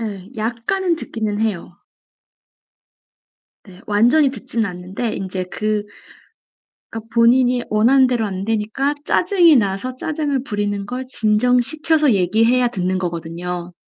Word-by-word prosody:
예. 200 -4 -6
약간은 240 - -1
듣기는 215 -7 -4
해요. 190 -5 -3 1.9
네. 190 -2 -15
완전히 245 +8 +3
듣진 230 -2 -3
않는데 185 +5 -5
인제 185 -1 -4
그 210 +3 -2 1.1
그러니까 225 0 -8
본인이 245 +1 +4
원하는 255 +5 +4
대로 240 -3 0
안 190 -1 -4
되니까 225 +6 -1
짜증이 350 -5 +4
나서 205 +4 -1
짜증을 290 -2 -2
부리는 205 -3 -2
걸 250 +4 -5
진정시켜서 250 +7 +2
얘기해야 225 +6 +2
듣는 185 -4 -2
거거든요. 175 0 -5
220 Hz, 275 characters per minute, -19 LUFS, 195-255 Hz, 1.9 s, 본인이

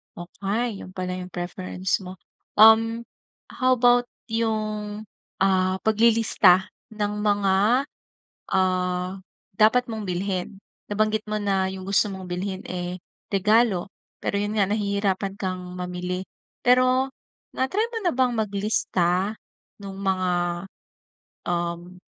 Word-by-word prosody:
Okey. 200 +5 -3
Yun 185 - -9
pala 185 0 -3
yung 180 0 -8
preference 185 +2 -2
mo. 185 0 -8 0.4
Um, 225 +2 +6 0.5
how 255 -1 +2
about 245 0 +4 0.2
yung, 215 -2 -2 0.4
ah, 185 -1 +3
paglilista 220 -4 +4 0.2
ng 210 0 -2
mga, 205 +4 +3 0.7
ah, 185 0 0 0.4
dapat 220 +4 +5
mong 215 -2 -4
bilhin? 185 +1 -3 0.3
Nabanggit 215 +1 0
mo 215 - -2
na 195 -2 +1
yung 190 -1 -7
gusto 200 +1 +3
mong 190 -2 -7
bilhin, 185 +2 -4
eh, 180 0 -4 0.3
regalo. 210 -1 +3 0.3
Pero 200 - 0
yun 205 +1 -2
nga 200 - +4
nahihirapan 200 -2 0
kang 185 -2 -3 0.2
mamili. 180 +1 -3 0.4
Pero 255 +2 +4 0.4
na-try 380 +13 0
mo - - -2
na 350 - +3
bang 255 -2 +2
maglista 200 -2 0 0.5
nung 195 -1 -7
mga, 185 -2 +1 1.2
um, 175 +1 -3
200 Hz, 115 wpm, -24 LUFS, 185-220 Hz, 1.2 s, Um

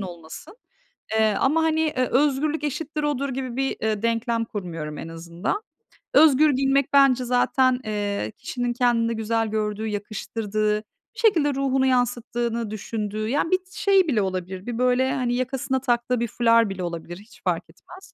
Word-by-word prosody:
olmasın. 175 - -9 0.6
Eee, 220 -1 +3
ama, 315 +4 +2
hani, 315 0 +2
eee, 300 -5 +1
özgürlük 295 +3 +1
eşittir 300 +1 -3
odur 285 -2 -1
gibi 255 -2 -4
bir, 270 0 -1
ııı, 215 -1 0
denklem 230 0 0
kurmuyorum 165 -8 -6
en 165 - -6
azından. 170 - -4 0.5
Özgür 305 0 +6
giyinmek 270 +1 +1
bence 270 -3 +5
zaten, 250 +1 +2
eee, 205 - -2
kişinin 245 -1 -3
kendinde 235 -2 +2
güzel 225 0 -1
gördüğü, 215 0 -2
yakıştırdığı, 210 0 -2 0.4
bir - - -10
şekilde 325 -11 +3
ruhunu 270 -1 +1
yansıttığını 240 -3 0
düşündüğü, 215 0 -4
yani, 290 +5 0
bir 370 - +4
şey 390 -3 +3
bile 230 -8 +2
olabilir, 185 0 -4
bir 240 -2 -4
böyle, 250 +1 +2
hani, 245 -2 -1
yakasına 260 +1 -1
taktığı 240 -1 0
bir 235 - 0
fular 230 -1 +3
bile 190 -2 -5
olabilir 170 0 -5
hiç 210 +3 -18
fark - - 0
etmez. 380 +2 -15
240 Hz, 155 wpm, -24 LUFS, 215-270 Hz, 0.6 s, Özgür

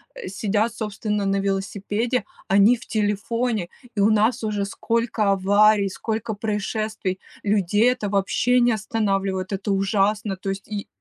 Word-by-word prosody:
а, - - -7
сидят, 210 +3 0
собственно, 210 -1 -2
на 195 0 +1
велосипеде, 200 +5 -1 0.2
они- 200 +5 +5
в 240 - -14
телефоне! 215 0 -1 0.3
И - - -2
у 200 +2 +5
нас 220 +2 +2
уже 210 -2 -1
сколько 225 0 0
аварий, 200 +1 +4
сколько 220 +3 -3
происшествий! 210 -2 -2 0.2
Людей- 205 +2 +3
это 220 -5 -3
вообще 210 +5 +2
не 240 0 +4
останавливает, 195 -3 -1
это 195 +1 -2
ужасно! 195 +1 +1
То 190 +1 -5
есть 195 0 -5
и 205 -1 -4
210 Hz, 140 wpm, -23 LUFS, 195-220 Hz, 0.3 s, они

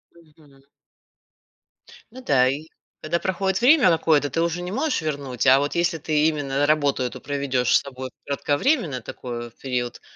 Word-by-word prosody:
Мгм. 150 -4 -22 1.5
Ну 260 +3 -11
да. 130 - +3
И 145 +4 -4 0.4
когда 165 +2 -1
проходит 190 +2 -1
время 265 - +6
какое-то, 160 -3 +2
ты 165 - -1
уже 170 +1 -1
не 180 +1 -5
можешь 270 - -1
вернуть, 140 -5 -3
а 135 +1 +7
вот 145 +1 -2
если 170 0 +1
ты 155 0 +1
именно 145 -2 0
работу 145 -3 +1
эту 125 +1 -5
проведешь 135 -3 0
с - - -1
собой 130 -1 -8 0.2
кратковременно 145 - 0
такой 120 0 -7
вот 120 - -14
период, 125 -2 -3
145 Hz, 160 wpm, -23 LUFS, 135-170 Hz, 1.5 s, а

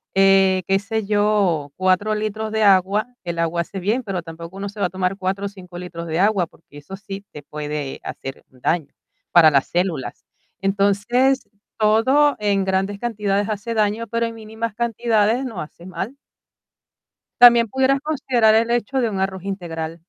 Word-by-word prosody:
eh, 195 -1 +4
qué 195 0 +3
sé 220 0 -3
yo, 205 -8 +1
4 185 +3 +1
litros 215 +1 -3
de 220 -1 +1
agua, 200 +2 +4 0.2
el 170 -1 -4
agua 165 +1 0
hace 190 +3 -6
bien, 215 +8 0
pero 190 -6 -4
tampoco 165 +3 -9
uno 200 +1 -4
se 205 +1 -12
va 190 - +2
a - - -12
tomar 185 +1 -2
4 195 +1 -2
o - - -2
5 180 -3 -12
litros 170 -2 -7
de 160 +2 -2
agua, 195 -4 +2
porque 145 -3 -18
eso 190 +7 -9
sí 195 0 -8
te 150 - -10
puede 150 -2 -5
hacer 135 0 -7
un 130 -1 -23
daño 160 -4 -1 0.4
para 160 -3 +7
las 140 -1 +2
células. 175 -5 -2 0.3
Entonces, 205 +7 +1 0.3
todo 245 +7 +3
en 200 -2 +1
grandes 190 +1 0
cantidades 205 -3 -1
hace 215 +2 -3
daño, 215 +2 0
pero 230 0 -1
en 230 - -4
mínimas 220 0 -5
cantidades 230 +1 +1
no 230 - -5
hace 170 +3 -11
mal. 210 +8 -6 1.2
También 235 -2 +8
pudieras 265 +2 +2
considerar 255 -7 +2
el 225 +1 +3
hecho 240 +3 0
de 235 -3 +1
un 195 -2 -3
arroz 190 -1 -2
integral. 165 -4 -5
200 Hz, 175 wpm, -21 LUFS, 180-220 Hz, 1.2 s, También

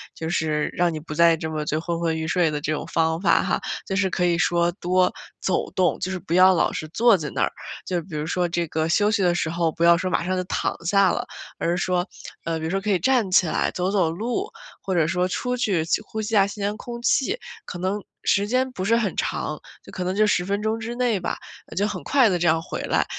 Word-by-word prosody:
就 160 - -4
是， 155 -3 0
让 175 -1 +1
你 - - -4
不 155 0 -7
再 170 +1 +5
这 160 0 -5
么 155 -1 -3
就 155 +1 -1
昏 170 0 -3
昏 165 -1 0
欲 160 0 -3
睡 170 0 +2
的 150 -1 -3
这 155 - -2
种 150 - -4
方 160 0 +1
法 - - +4
哈， - - 0 0.3
就 190 - -2
是 195 -1 +2
可 180 -1 0
以 170 -1 +2
说 170 +1 +2
多 185 0 +1 0.3
走 190 - 0
动， 185 -1 +1
就 185 - -2
是 190 - -3
不 175 -1 -5
要 185 +1 +7
老 170 - +2
是 155 - -5
坐 230 +4 +4
在 150 -4 -4
那 - - -2
儿。 - - +2 0.3
就 180 -2 -1
比 165 -2 -9
如 150 0 -2
说 180 +1 0
这 170 0 -1
个 160 +1 -1
休 205 +6 +3
息 215 -1 +1
的 175 -2 +3
时 165 - -1
候 165 0 0
不 165 - -3
要 170 0 +7
说 185 +2 -2
马 180 - 0
上 185 +2 -1
就 185 - -1
躺 - - -1
下 195 +1 +4
了， - - -2 0.3
而 170 - 0
是 175 - 0
说， 180 0 0 0.4
呃， 165 -1 -1
比 160 - -4
如 160 - -2
说 195 - +1
可 205 +2 -4
以 190 - +2
站 250 -4 +2
起 185 - +5
来 - - 0
走 180 +1 -1
走 185 -5 +2
路， 240 - -2 0.3
或 190 - -3
者 160 -3 +3
说 180 +1 +1
出 250 +6 -2
去 195 -9 +1
去 170 - +1
呼 220 +1 -5
吸 215 +1 -4
一 - - +6
下 195 - +6
新 200 0 -6
鲜 205 +1 -1
空 235 +1 -7
气。 285 - +1 0.3
可 175 - -7
能 190 +3 -1 0.2
时 200 +1 +2
间 255 +3 +1
不 185 -6 -4
是 230 +3 +3
很 225 -4 0
长， - - -2 0.2
就 - - -13
可 185 - -4
能 185 +1 -1
就 215 +1 +4
10 180 -4 +1
分 200 +2 -1
钟 220 +1 -1
之 230 +1 -5
内 240 -5 +1
吧， 175 - -3 0.4
就 200 +4 +1
很 - - -5
快 265 -5 +4
地 180 -2 0
这 175 - +1
样 160 0 +3
回 165 - -5
来。 - - +1
180 Hz, 285 characters per minute, -23 LUFS, 165-205 Hz, 0.4 s, 要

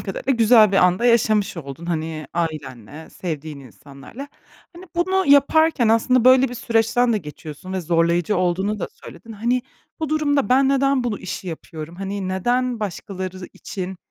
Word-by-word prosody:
kadarıyla 220 +7 -2
güzel 220 -3 +5
bir - - +2
an 180 -1 +4
da 240 - -3
yaşamış 215 -5 +2
oldun, 150 +2 -8
hani, 160 -2 -3
ailenle, 155 -4 -5
sevdiğin 155 -4 -6
insanlarla. 140 - -12 0.5
Hani, 355 +2 -11
bunu 375 +2 +1
yaparken 285 -2 +4
aslında 230 +2 +3
böyle 260 0 +6
bir 245 - -7
süreçten 230 0 +1
de 215 - +1
geçiyorsun 155 +2 -9
ve 190 - -2
zorlayıcı 170 +3 +1
olduğunu 190 +4 0
da - - -4
söyledin. 225 - -13
Hani, 240 +4 -1 0.4
bu 315 - -2
durumda, 290 -6 +1
"Ben 265 +2 +4
neden 275 -2 +2
bunu 220 -4 -2
işi 185 0 -6
yapıyorum, 160 0 -8
hani, 195 0 -4
neden 240 +5 -1
başkaları 190 -2 -5
için 190 -1 -7
200 Hz, 155 wpm, -21 LUFS, 170-250 Hz, 0.5 s, böyle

